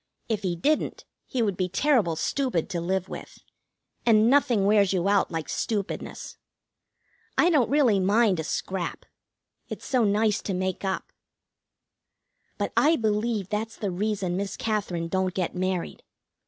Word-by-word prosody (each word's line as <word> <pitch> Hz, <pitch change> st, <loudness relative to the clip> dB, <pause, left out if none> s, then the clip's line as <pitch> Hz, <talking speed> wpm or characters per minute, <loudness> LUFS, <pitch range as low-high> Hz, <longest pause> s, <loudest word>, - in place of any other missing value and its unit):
If 220 Hz, -3 st, -1 dB
he 180 Hz, -3 st, -1 dB
didn't, 295 Hz, -, 0 dB, 0.2 s
he 250 Hz, -4 st, 0 dB
would 200 Hz, -4 st, 0 dB
be 185 Hz, 0 st, -1 dB
terrible 215 Hz, -, +2 dB
stupid 250 Hz, -, -1 dB
to 170 Hz, -, -2 dB
live 185 Hz, +1 st, -1 dB
with, -, -, -9 dB, 0.7 s
and 225 Hz, 0 st, +5 dB
nothing 255 Hz, -8 st, +3 dB
wears 200 Hz, -2 st, +4 dB
you 185 Hz, 0 st, +1 dB
out 200 Hz, 0 st, +3 dB
like 165 Hz, -2 st, -4 dB
stupidness. 205 Hz, -3 st, -4 dB, 1.0 s
I 350 Hz, -, +5 dB
don't 280 Hz, -8 st, +3 dB
really 265 Hz, -8 st, +4 dB
mind 200 Hz, -1 st, +3 dB
a -, -, -1 dB
scrap. 180 Hz, +2 st, -3 dB, 0.6 s
It's -, -, -7 dB
so 255 Hz, -3 st, +2 dB
nice 210 Hz, +1 st, +2 dB
to 195 Hz, -, -3 dB
make 185 Hz, +1 st, -2 dB
up. 190 Hz, -1 st, -3 dB, 1.4 s
But -, -, -2 dB
I 315 Hz, +3 st, +5 dB
believe 215 Hz, -, -1 dB
that's 220 Hz, +2 st, -3 dB
the 205 Hz, -4 st, -3 dB
reason 195 Hz, -1 st, -1 dB
Miss 200 Hz, 0 st, -3 dB
Katherine 195 Hz, -6 st, -2 dB
don't 185 Hz, +1 st, -1 dB
get 180 Hz, -3 st, -1 dB
married. 185 Hz, -1 st, -2 dB
200 Hz, 150 wpm, -26 LUFS, 185-225 Hz, 1.4 s, and